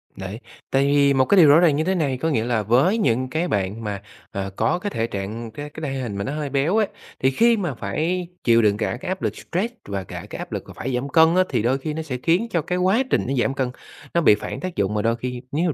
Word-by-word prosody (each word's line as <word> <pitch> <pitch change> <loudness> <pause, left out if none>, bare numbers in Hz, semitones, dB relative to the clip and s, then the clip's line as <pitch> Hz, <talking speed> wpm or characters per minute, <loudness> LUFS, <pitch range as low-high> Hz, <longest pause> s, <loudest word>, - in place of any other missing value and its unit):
Đấy. 95 +3 -6 0.3
Tại 135 +1 +3
vì 140 -1 +4
một 130 -1 +3
cái 200 - +3
điều 165 - +8
rõ 150 - +7
ràng 165 -4 +4
như 155 - +1
thế 190 +3 0
này, 140 -7 0
có 160 +6 -1
nghĩa 115 -8 +1
là 115 -3 0
với 130 - +3
những 130 - +1
cái 160 +5 -1
bạn 100 - -2
mà, 100 -2 -4 0.3
ờ, 95 0 -3
có 175 - +1
cái 205 - -3
thể 115 - -2
trạng, 110 +3 -5
cái 145 +6 -7
cái 150 -1 -5
thể 135 - -3
hình 115 -6 -4
mà 100 - -2
nó 135 - -3
hơi 150 -2 -3
béo 145 +9 +1
ấy, 215 -3 +3 0.3
thì 130 - +2
khi 230 - +4
mà 175 -8 -2
phải 160 - -2 0.2
chịu 115 -1 +5
đựng 105 -2 +3
cả 115 +2 -2
cái 185 - -5
áp 185 0 -3
lực - - -1
stress 210 +8 -3
và 100 -1 -3
cả - - -8
cái - - -7
áp - - -7
lực - - -3
mà - - -10
phải 130 - -4
giảm 130 +3 -2
cân 160 +3 +5
á, 185 - +5
thì 120 - 0
đôi 125 +4 +1
khi 150 +3 -4
nó 160 - -3
sẽ 140 -6 -4
khiến 175 +8 +2
cho 170 - 0
cái 180 +4 -2
quá 190 +8 +3
trình - - +2
nó 135 - -1
giảm 135 - 0
cân 130 -2 -1 0.4
nó 170 - +3
bị 105 - +6
phản 105 - -6
tác 185 -1 -5
dụng 100 +1 0
và 105 - +1
đôi 115 +2 +1
khi 125 +1 -5
nếu 160 +5 0
mà - - -1
135 Hz, 295 wpm, -22 LUFS, 115-170 Hz, 0.4 s, điều